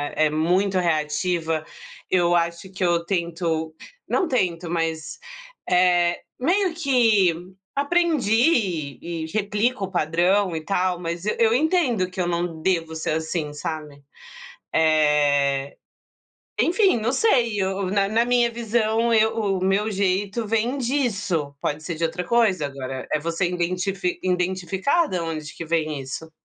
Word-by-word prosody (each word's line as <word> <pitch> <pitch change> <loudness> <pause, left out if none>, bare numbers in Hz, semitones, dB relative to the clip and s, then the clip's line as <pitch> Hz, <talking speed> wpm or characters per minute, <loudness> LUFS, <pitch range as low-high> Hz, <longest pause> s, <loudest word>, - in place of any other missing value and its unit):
é 155 0 +3
muito 185 +5 +1
reativa. 160 0 0 0.5
Eu 175 -1 +3
acho 170 +2 -1
que 190 0 -4
eu 170 -1 +1
tento 170 -3 -2 0.4
não 370 -5 +1
tento 175 -8 -1
mas, 165 - -2 0.5
eh, 180 -1 +3 0.2
meio 360 +5 +1
que 235 - +3 0.4
aprendi 245 - +1
e 170 -1 -4
e - - -3
replico 210 +3 -1
o 190 - -11
padrão 175 +3 +1
e 160 - -3
tal, 185 -2 0
mas 170 +2 -4
e 210 - 0
eu 225 0 +4
entendo, 255 - +1
que 185 - -9
eu 180 - +1
não 170 -1 -2
devo 165 -2 -1
ser, 160 - -2
assim, 160 -1 -2
sabe, 150 -1 -6 0.7
eh, 145 -3 +2 0.8
enfim, 375 - +3
não 230 +3 0
sei, 240 - +2
eu 190 0 -1
na 200 0 +2
na 225 +3 +2
minha 240 -1 +2
visão, 230 0 0
eu 220 0 +3
o 195 -4 -1
meu 200 +3 +1
jeito 200 +3 -1
vem 225 +5 0
disso, 205 - -1
pode 150 +1 -2
ser 165 +1 -4
de 165 - -4
outra 165 +2 -1
coisa 195 -7 +2
agora, 135 -1 -6
é - - +2
você 170 +3 -1
identifi 180 +1 -2
identificar 185 - 0
da 180 -2 -2
onde 155 -2 -5
que 165 - -6
vem 155 -3 -1
isso. 160 +5 -7
180 Hz, 145 wpm, -23 LUFS, 165-220 Hz, 0.8 s, eu